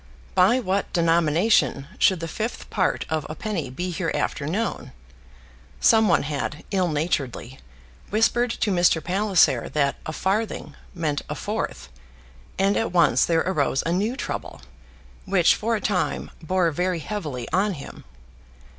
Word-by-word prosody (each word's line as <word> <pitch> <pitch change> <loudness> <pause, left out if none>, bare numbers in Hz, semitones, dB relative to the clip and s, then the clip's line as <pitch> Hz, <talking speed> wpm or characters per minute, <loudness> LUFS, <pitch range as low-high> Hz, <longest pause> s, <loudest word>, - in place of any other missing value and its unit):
By 240 - +4
what 200 -4 -1
denomination 165 -2 +2
should 185 -3 +3
the 165 - -3
fifth 220 +8 -5
part 185 -3 0
of 155 -1 -1
a 155 - -5
penny 195 - -3
be 180 +8 -4
hereafter 165 -4 -2
known? 210 +8 -3 0.9
Some 220 - +5
one 170 - +3
had, 145 0 -4
ill 185 -3 +2
naturedly, 145 -5 -2 0.5
whispered 225 +3 +2
to 220 -2 -1
Mr. 175 -3 +3
Palliser 185 - +2
that 140 0 0
a - - -2
farthing 200 +6 -2 0.2
meant 155 -4 -1
a - - -3
fourth, - - -4 0.7
and 195 +1 +2
at 225 - -1
once 175 -1 +4
there 165 -1 +2
arose 145 -7 0
a 165 - 0
new 205 +8 0
trouble, - - -5 0.6
which 190 -3 +4
for 230 +2 -1
a 210 - -3
time 185 -2 -1
bore 175 0 +1
very 180 +3 -1
heavily 155 - -5
on 195 +3 +2
him. 140 -5 -10
175 Hz, 145 wpm, -24 LUFS, 155-200 Hz, 0.9 s, Some